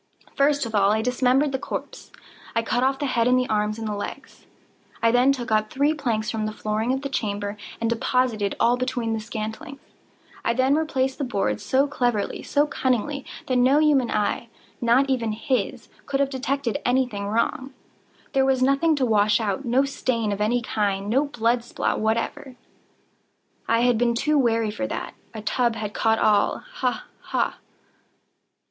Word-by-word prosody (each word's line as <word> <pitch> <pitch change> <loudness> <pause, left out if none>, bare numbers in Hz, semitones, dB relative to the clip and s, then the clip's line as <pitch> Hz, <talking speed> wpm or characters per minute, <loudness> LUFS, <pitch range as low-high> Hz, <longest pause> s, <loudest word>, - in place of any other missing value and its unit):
First 285 -1 +2
of 225 - -6
all 200 -1 +4
I 220 +1 +1
dismembered 255 +3 +2
the 265 - -2
corpse. - - -6 0.4
I 230 - +2
cut 245 +2 0
off 270 +1 +2
the 285 - -2
head 235 -3 +1
and 250 0 +4
the 255 0 +1
arms 210 0 0
and 225 -1 -4
the 210 - -2
legs. 205 - -7 0.5
I 230 - +3
then 250 +3 +4
took 250 -4 -3
up 215 0 +2
three 285 +5 +2
planks 230 -8 -1
from 220 -1 -2
the - - -3
flooring 215 +2 -2
of 265 +1 -2
the - - -1
chamber, 205 -5 -3 0.2
and 230 - 0
deposited 230 -3 0
all 240 +1 +3
between 250 -3 -1
the 220 - -1
scantlings. 225 +6 -6 0.6
I 235 - +1
then 260 +2 +3
replaced 275 -4 0
the - - -1
boards 195 - -1
so 270 +2 +2
cleverly, 245 -7 -1
so 290 0 +2
cunningly, 270 0 -1 0.2
that 255 - 0
no 255 +3 +4
human 295 -5 +3
eye—not 235 +4 0
even 235 -5 0
his—could 270 +3 -3
have 275 -1 +1
detected 265 -2 -2
any 255 +2 +3
thing 205 -4 -5
wrong. 230 +5 -1 0.6
There 270 -1 +3
was 265 -1 +2
nothing 275 +4 +3
to 270 -3 +1
wash 210 -2 +3
out—no 240 +5 +1
stain 235 -5 -1
of 200 0 -3
any 235 +3 +1
kind—no 210 +6 0
blood 240 -3 0
spot 240 - -2
whatever. 230 +4 -2 1.1
I 230 0 +3
had 245 -2 +3
been 235 -1 +2
too 300 +5 +2
wary 230 -4 +1
for 275 +6 -3
that. - - -5 0.2
A 215 - -6
tub 235 0 +1
had 210 -2 -5
caught 225 0 +2
all—ha! 225 - 0
ha! - - -2
245 Hz, 170 wpm, -24 LUFS, 220-270 Hz, 1.1 s, all